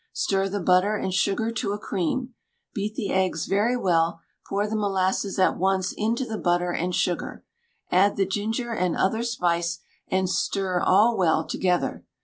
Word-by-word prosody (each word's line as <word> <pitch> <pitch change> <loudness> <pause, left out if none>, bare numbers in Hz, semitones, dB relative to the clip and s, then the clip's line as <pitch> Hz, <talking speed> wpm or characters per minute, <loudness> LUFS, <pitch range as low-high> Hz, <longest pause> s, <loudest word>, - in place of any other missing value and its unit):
Stir 195 0 0
the 205 +1 -2
butter 185 +3 +3
and 190 -3 -2
sugar 200 +4 +1
to 205 -3 -2
a - - -3
cream; 235 +6 -2 0.4
beat 210 0 -3
the 210 -7 -3
eggs 185 -4 0
very 215 +6 +1
well; 165 -5 +1 0.3
pour 205 +1 -1
the 220 - -3
molasses 195 -1 0
at 185 - +3
once 190 0 +1
into 230 +4 -1
the 220 -3 -5
butter 175 0 +1
and 175 +1 -2
sugar. 175 - -2 0.5
Add 195 +3 +4
the 195 - +1
ginger 220 +5 -2
and 180 -5 0
other 220 +4 +1
spice, 175 -7 0 0.3
and 190 0 +1
stir 190 0 0
all 215 +5 +4
well 170 -5 +2
together. 180 -2 -1
195 Hz, 165 wpm, -25 LUFS, 180-215 Hz, 0.5 s, Add